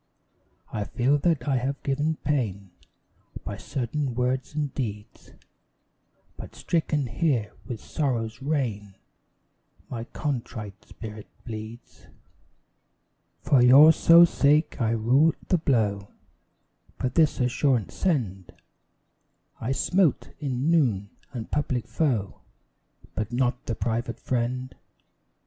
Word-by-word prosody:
I 105 -1 -2
feel 135 +6 +1
that 150 -5 0
I 135 -2 +2
have 135 +3 -3
given 150 +3 0
pain 105 -10 -1 0.7
By 100 - -5
certain 125 +3 -3
words 130 +3 -1
and 145 -3 -2
deeds, 105 -5 -6 1.0
But - - -10
stricken 155 -4 0
here 120 -4 0
with 120 -4 -5
Sorrow's 115 -5 -2
rain, 115 -9 -2 1.0
My 115 -2 -4
contrite 115 -8 -5
spirit 110 -1 -9 0.2
bleeds. 110 0 -9 1.4
For 135 -4 +4
your 140 +6 +8
sole 170 +1 +7
sake 150 -2 +2
I 115 - +2
rue 130 +8 +3
the 180 - +3
blow, 105 -9 +1 0.9
But 125 -1 -2
this 155 -2 +3
assurance 125 -2 +1
send: 105 - -2 1.0
I 115 - -2
smote, 175 +3 +1
in 140 +1 -1
noon, 110 - +2 0.2
the 120 -3 -5
public 130 -2 -2
foe, 120 -11 -1 0.7
But 110 +1 -3
not 125 0 -1
the 115 - -1
private 115 0 -2
friend. 125 +1 -2
125 Hz, 110 wpm, -26 LUFS, 110-145 Hz, 1.4 s, your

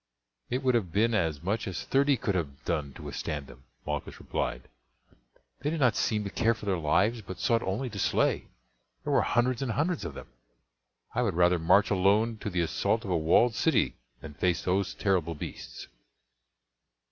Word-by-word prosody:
"It 125 +3 -1
would 130 -1 +3
have 105 -8 0
been 115 +5 +2
as 80 -7 0
much 105 +5 -1
as 95 -2 -4
thirty 140 0 +3
could 100 - -1
have 75 -5 -4
done 75 -5 -1
to - - -11
withstand 75 -3 -4
them," 65 0 -15 0.2
Malchus - - -4
replied; - - -3 0.9
"they 145 - -1
did 160 +1 -2
not 125 -5 +3
seem 105 -2 0
to 100 - -5
care 115 0 +2
for 110 - -10
their 95 -3 0
lives, 105 +9 +2
but 95 -2 -8
sought 115 +1 +2
only 105 +7 -2
to 100 - -6
slay. - - +1 0.6
There - - -1
were - - +5
hundreds 120 +1 +1
and 125 -4 -1
hundreds 160 +5 0
of 80 -5 -6
them. - - -10 0.8
I 125 - +1
would 105 -8 0
rather 90 0 +4
march 90 +6 +4
alone 105 +4 +3
to 105 - -4
the 90 -2 0
assault 110 +7 0
of 95 - -3
a - - +2
walled 85 +9 +4
city - - +2 0.3
than 75 -1 -9
face 90 +3 0
those 95 +2 0
terrible 90 -5 0
beasts." - - -8
100 Hz, 190 wpm, -29 LUFS, 85-115 Hz, 0.9 s, were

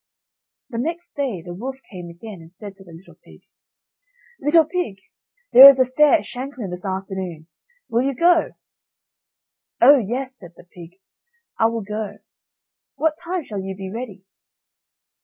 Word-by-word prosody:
The 230 - -4
next 345 +6 -4
day 250 - -3
the 175 - -8
wolf 255 +9 -6 0.2
came 180 -3 -8
again, 180 +2 -11
and 165 0 -16
said 200 +2 -10
to 195 - -14
the 175 - -16
little 165 +4 -15
pig: - - -18 1.0
"Little 310 +3 +4
pig, 350 - -3 0.6
there 270 +2 +12
is 270 -1 +4
a 260 - +5
fair 295 +5 +3
at 325 - -1
Shanklin 250 -6 -7
this 180 0 -7
afternoon, 190 -4 -5 0.4
will 235 - +1
you 275 +1 -1
go?" 340 +4 +3 1.3
"Oh 275 +3 +7
yes," 255 +4 -4
said 175 -3 -13
the - - -16
pig, 175 +1 -15 0.6
"I 225 - +5
will 230 -1 -3
go; 210 +1 -5 0.8
what 310 +2 +1
time 350 0 -3
shall 210 -7 -6
you 190 0 -6
be 190 0 -7
ready?" 215 -5 -8
225 Hz, 160 wpm, -21 LUFS, 190-275 Hz, 1.3 s, there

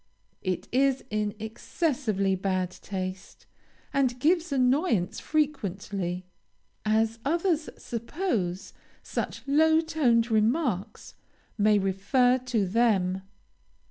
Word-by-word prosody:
It 185 -2 -2
is 270 +1 +2
in 210 0 -1
excessively 220 - -1
bad 185 -1 -1
taste, 185 0 -6 0.5
and 255 -3 +1
gives 335 +3 +2
annoyance 255 - +2
frequently, 195 - -2 0.6
as 220 +1 +1
others 330 +1 +1
suppose 230 - -3 0.3
such - - -4
low 315 +3 +5
toned 250 -8 +2
remarks 220 - 0 0.5
may 210 0 +5
refer 205 +7 +2
to 245 -5 0
them. 190 -3 +2
230 Hz, 90 wpm, -27 LUFS, 195-275 Hz, 0.6 s, low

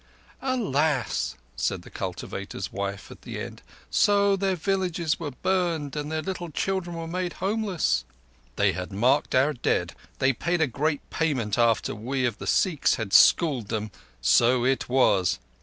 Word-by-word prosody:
"Alas!" 145 - 0 0.2
said - - -2
the - - -14
cultivator's 90 -3 -5
wife 100 0 -4
at - - -12
the - - -6
end. - - -7 0.3
"So 200 -1 +4
their 195 -1 0
villages 175 -2 -1
were 160 -3 -3
burnt 165 -1 -1
and 150 0 -4
their 155 0 -2
little 180 -3 -4
children 170 -1 -3
made 180 -1 -2
homeless?" 190 - 0 0.5
"They - - +3
had 90 +2 -5
marked 125 +10 +2
our 135 +4 +4
dead. 125 - 0 0.2
They 130 +1 +3
paid 170 +7 -1
a 160 - +4
great 145 +3 -2
payment 125 -9 0
after 115 -1 +2
we 125 +5 -2
of 120 -3 -2
the - - -6
Sikhs 170 -7 +2
had 110 -4 -5
schooled 140 - +5
them. 105 0 -3 0.3
So 120 - +4
it 130 -1 0
was. 100 - +3
145 Hz, 155 wpm, -26 LUFS, 115-175 Hz, 0.5 s, schooled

